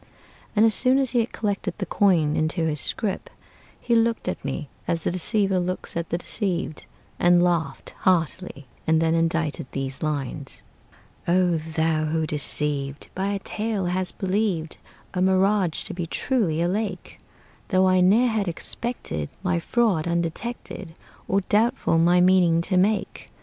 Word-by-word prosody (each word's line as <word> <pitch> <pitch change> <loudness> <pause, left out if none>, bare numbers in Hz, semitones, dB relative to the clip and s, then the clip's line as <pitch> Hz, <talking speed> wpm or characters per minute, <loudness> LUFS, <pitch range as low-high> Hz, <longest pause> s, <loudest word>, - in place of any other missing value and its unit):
And 215 +1 +5
as 225 - +4
soon 255 +6 +4
as 270 -3 +2
he 245 - +2
had 230 - -1
collected 205 -2 -2
the - - -3
coin 165 -7 +2
into 160 +2 0
his 150 -2 0
scrip, 205 -4 -2 0.5
He 240 - -1
looked 230 0 +2
at - - -3
me 135 +2 -4 0.2
as 165 -1 -1
the - - 0
deceiver 195 +1 +1
looks 180 +1 -2
at 170 0 -3
the 170 - 0
deceived, 175 -4 -3 0.3
And 175 0 +5
laughed 170 -2 -1
heartily, 175 -4 0 0.2
and 160 0 +4
then 165 0 +2
indited 165 -4 0
these 135 -1 -3
lines: 145 -2 -4 0.6
"O 175 -1 +3
thou 160 0 0
who, 160 +1 0
deceived 145 -1 -2
By 190 +1 -2
a 200 0 -1
tale, 210 0 -3
hast 180 +1 -2
believed 190 -4 -1 0.4
A 180 - -1
mirage 190 -2 +3
to - - -5
be 175 -1 -4
truly 175 - 0
a - - +1
lake, 195 -1 -3 0.5
Though 185 -1 +3
I 185 0 +4
ne'er 220 +7 +4
had 215 -3 -1
expected 170 - -3
My 180 -2 +1
fraud 195 -4 +1
undetected, 170 +1 -4 0.3
Or 195 +1 +2
doubtful 215 -3 +2
my 175 +2 +4
meaning 180 -2 +4
to 185 +2 0
make! 200 +2 0
180 Hz, 155 wpm, -24 LUFS, 160-200 Hz, 0.6 s, And